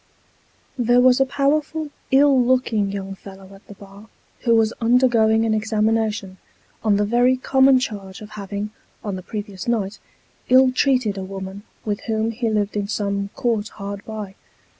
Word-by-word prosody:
There 245 +1 +4
was 255 0 +5
a 270 - +3
powerful, 295 +3 0 0.2
ill 270 -1 +5
looking 240 -5 +1
young 195 -1 -5
fellow 195 0 -13
at 195 - -17
the 205 - -11
bar, 200 +2 -14 0.3
who 235 -2 +2
was 225 0 +2
undergoing 230 -2 +3
an 220 - +1
examination, 215 -2 -1 0.4
on 215 -2 +3
the 205 - +1
very 245 +4 +3
common 265 +1 +4
charge 200 -7 -6
of 210 0 -11
having, 205 0 -5 0.3
on 205 -3 -3
the 185 - -6
previous 205 0 -7
night, 215 -3 -1 0.5
ill 255 +1 +6
treated 255 -6 +1
a - - -4
woman, 190 +1 -7 0.2
with 205 -1 -2
whom 220 0 0
he 230 0 -2
lived 210 -1 -1
in 205 -1 -1
some 200 -1 -2
court 225 -3 -1
hard 200 -2 -7
by. 215 -3 -7
220 Hz, 160 wpm, -21 LUFS, 200-245 Hz, 0.5 s, ill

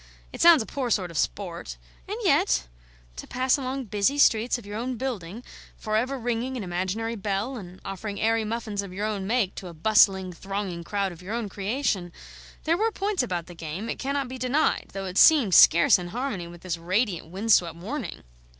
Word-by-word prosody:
It - - -6
sounds 335 -7 +7
a - - -11
poor 260 0 -3
sort 185 -6 0
of 165 - -6
sport; - - -3 0.3
and - - -4
yet - - +3 0.5
to - - -7
pass 255 +1 +2
along 270 -1 -3
busy 210 +6 +1
streets 235 -4 +4
of 240 - -12
your 205 +1 -7
own 245 +3 -3
building, 225 -4 -5 0.3
for 215 -1 -3
ever 255 +5 0
ringing 245 +2 -2
an 230 - -4
imaginary 190 +6 -2
bell 205 +5 -2
and 185 -5 -9
offering 200 +1 -5
airy 225 0 +2
muffins 215 -2 -3
of 200 -2 -8
your 200 +3 -3
own 205 -3 -3
make 220 -4 +1
to 185 - -8
a 170 - -10
bustling 190 0 +3
thronging 195 -1 -4
crowd 200 +1 -1
of 175 0 -12
your 200 +5 -5
own 230 -3 -3
creation 195 -3 -2 0.5
there 330 +2 +2
were 445 +3 +1
points 405 -2 -1
about 180 -9 -3
the 175 - -11
game, 170 +6 -6
it - - -4
cannot 275 0 -1
be 260 +1 -7
denied, 255 +5 +1
though 195 0 -4
it 185 0 -1
seemed 275 - +6
scarce 170 +2 +7
in 175 - -6
harmony 215 -4 -4
with 170 0 -12
this 175 -2 -4
radiant 185 +1 -1
wind 195 +7 -2
swept 170 -5 +4
morning! 220 - -6
210 Hz, 205 wpm, -26 LUFS, 185-250 Hz, 0.5 s, sounds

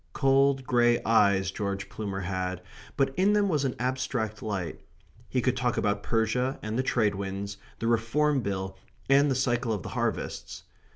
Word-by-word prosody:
Cold 135 -1 +3
grey 120 -1 +3
eyes 100 -4 +3
George 100 -1 -3
Plumer 100 -3 -4
had, 90 -1 -3 0.4
but 135 -1 +2
in 200 +2 +4
them 205 -1 +3
was 150 -6 +1
an 130 - -1
abstract 125 -3 -2
light. 95 -7 -4 0.5
He 125 -2 0
could 130 -1 +2
talk 125 -1 0
about 105 -1 +1
Persia 120 +5 0
and 110 +1 -3
the 130 - +2
Trade 110 -5 +1
winds, 100 +1 -4 0.2
the - - -4
Reform 125 +5 +2
Bill 95 -2 -4 0.3
and 140 +1 +6
the 135 - +1
cycle 120 -2 0
of 100 -6 -2
the - - -6
harvests. - - -3
115 Hz, 170 wpm, -28 LUFS, 100-130 Hz, 0.5 s, and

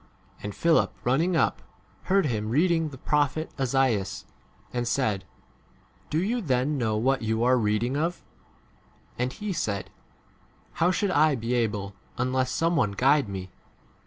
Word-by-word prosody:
And 105 -1 -6
Philip, 165 -1 +3
running 160 +9 +2
up, 155 - +1 0.4
heard 195 -1 +3
him 110 -5 -1
reading 165 +4 +2
the 135 - -10
prophet 150 +3 0
Esaias, 125 -7 0 0.5
and 120 -1 -1
said, 105 -8 0 0.8
Do 155 - -1
you 220 +8 0
then 135 - +1
know 110 -5 0
what 130 +4 +1
you 110 +1 0
are 125 +1 +5
reading 110 +2 +1
31 150 +3 +1
of? 175 - -9 1.0
And 125 +1 0
he 210 +2 -4
said, 100 - -3 0.9
How 170 - +5
should 195 +1 +1
I 155 -2 +4
be 115 0 -3
able 105 -5 -1 0.2
unless 130 +1 0
some 165 +5 +1
one 105 -11 +1
guide 135 +3 +3
me 95 -2 -6
130 Hz, 150 wpm, -26 LUFS, 110-155 Hz, 1.0 s, are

